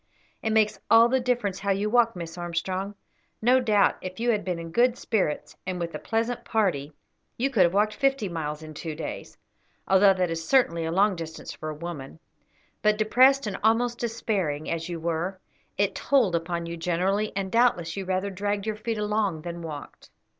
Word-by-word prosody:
"It 220 - -1
makes 215 -2 +2
all 230 +1 +7
the 260 +1 +2
difference 240 -6 -1
how 200 +1 -3
you 200 +2 +1
walk, 230 0 +3
Miss 170 -1 -6
Armstrong. 185 +3 -3 0.4
No 250 +3 +4
doubt, 215 -5 +3
if 185 +1 -7
you 240 +1 +2
had 210 -2 0
been 180 -2 -2
in 165 0 -7
good 245 +5 +3
spirits, 190 -10 -1
and 185 -1 -2
with 170 -1 -3
a - - -4
pleasant 230 +2 -1
party, 165 -10 0 0.4
you 270 +3 0
could 220 - +3
have 170 - 0
walked 210 +1 +3
fifty 270 -2 +1
miles 160 -3 -4
in 155 0 -9
two 155 0 -5
days, 155 -1 -7 0.5
although 195 +1 +6
that 180 -2 0
is 165 0 -3
certainly 170 -8 +2
a 160 - -2
long 195 +3 +3
distance 165 -1 -7
for 155 - -6
a 155 - -5
woman; 155 -3 -7 0.6
but 210 0 +3
depressed 255 +5 +4
and 205 -3 -3
almost 235 +2 +2
despairing, 200 -10 -2
as 165 +1 -3
you 170 -1 -4
were, 170 +3 -2 0.4
it 200 -1 +1
told 255 -10 +2
upon 170 0 -2
you 170 0 -5
generally, 185 +5 0
and 195 -1 -2
doubtless 230 -9 +2
you 195 - -3
rather 190 +2 -1
dragged 205 +1 -2
your 215 -1 -2
feet 225 +1 -3
along 210 -6 -1
than 170 0 -6
walked." 150 -3 -8
195 Hz, 195 wpm, -26 LUFS, 170-220 Hz, 0.6 s, all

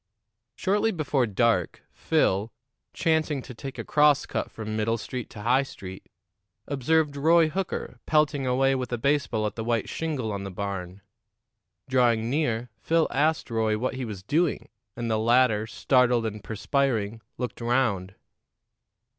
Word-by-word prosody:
Shortly 205 +3 +1
before 145 - 0
dark, 105 -4 +1
Phil, 100 +4 +1 0.4
chancing 155 -4 0
to 125 - -9
take 135 +3 -8
a - - -4
cross 150 -1 +4
cut - - -3
from 110 -1 -6
Middle 110 +1 0
Street 125 +1 -6
to 105 - -9
High 125 +4 +4
Street, 95 -8 -9 0.6
observed 145 +2 +1
Roy 160 +3 +4
Hooker 170 -7 -4
pelting 150 -3 +2
away 135 +2 +3
with 130 -1 -3
a 120 - 0
baseball 130 -4 +1
at 105 - -2
the 110 - -4
white 115 -1 0
shingle 145 -9 -2
on 100 -1 -4
the 100 - -5
barn. 95 -1 -5 0.9
Drawing 120 -3 +2
near, 125 -6 -1
Phil 165 +4 +2
asked 155 -2 +1
Roy 110 -1 +1
what 130 +4 -1
he 130 0 -4
was 105 -5 -6
doing, 160 - 0 0.3
and 120 -1 -3
the 110 - +1
latter, 115 -2 +3
startled 125 -1 +2
and 105 -1 -4
perspiring, 115 -2 -1 0.2
looked 125 -1 -5
round. 110 -6 0
125 Hz, 150 wpm, -26 LUFS, 110-145 Hz, 0.9 s, cross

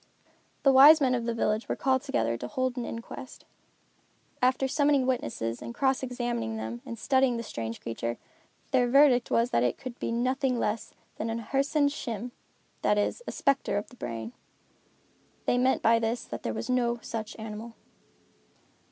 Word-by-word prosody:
The 275 - +6
wise 285 +4 +9
men 260 -3 +2
of 235 -2 -1
the 235 - -1
village 215 0 0
were - - 0
called 260 -1 +1
together 115 - 0
to 125 +1 -5
hold 255 - -1
an 245 -2 -3
inquest. 230 +2 -8 1.0
After 255 +1 +2
summoning 285 -1 +2
witnesses, 115 - -2
and 235 - -7
cross 265 0 +1
examining 240 - -3
them 110 +2 -5
and 230 - -6
studying 260 0 +2
the 230 - -4
strange 115 - -5
creature, 115 +1 -4 0.5
their 250 -3 +3
verdict 265 -2 +5
was 235 +1 +2
that - - +2
it 125 -1 +1
could 250 -1 -8
be - - -2
nothing 255 +2 0
less 220 -1 -2 0.2
than 225 - -3
a 225 +1 -2
Hersen 275 +5 +1
Schim, 245 -4 -4 0.5
that 210 - +2
is, 205 - 0
a - - -2
spectre 275 -6 +1
of 205 - -4
the - - -16
brain. 115 - -6 1.1
They 245 - +2
meant 260 +1 +2
by 230 +1 +5
this 230 +1 -1
that - - -7
there - - -2
was - - -4
no 245 -2 +1
such 220 -2 -5
animal. 220 +1 -7
240 Hz, 175 wpm, -28 LUFS, 215-260 Hz, 1.1 s, wise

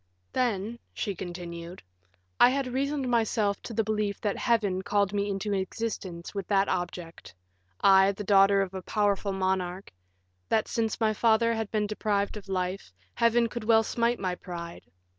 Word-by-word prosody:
"Then," 230 -2 -1 0.2
she 205 - -2
continued, 175 -1 -7 0.6
"I 245 - +8
had 275 +1 0
reasoned 275 0 -1
myself 220 -4 +1
into 230 - -9
the 225 - +2
belief 210 -1 -1
that 205 -2 0
Heaven 210 -6 +1
called 200 +1 +1
me 205 0 0
into 200 +1 -2
existence 190 -3 -4
with 200 -3 -4
that 195 -1 +3
object 175 - -4 0.5
I, 195 0 +6
the 200 +1 -6
daughter 195 0 +5
of 190 -1 -7
a 190 - -5
powerful 205 0 0
monarch; 190 -1 -2 0.6
that 220 - +2
since 225 -2 -1
my 220 -1 +2
father 230 +1 +3
had 220 -2 -3
been 215 -1 0
deprived 205 -1 -1
of 205 -2 -9
life, 185 - -2 0.2
Heaven 235 0 +3
could 235 0 -6
well 225 0 +5
smite 235 +2 0
my 185 -2 -1
pride. 170 -2 -8
200 Hz, 160 wpm, -28 LUFS, 190-225 Hz, 0.6 s, I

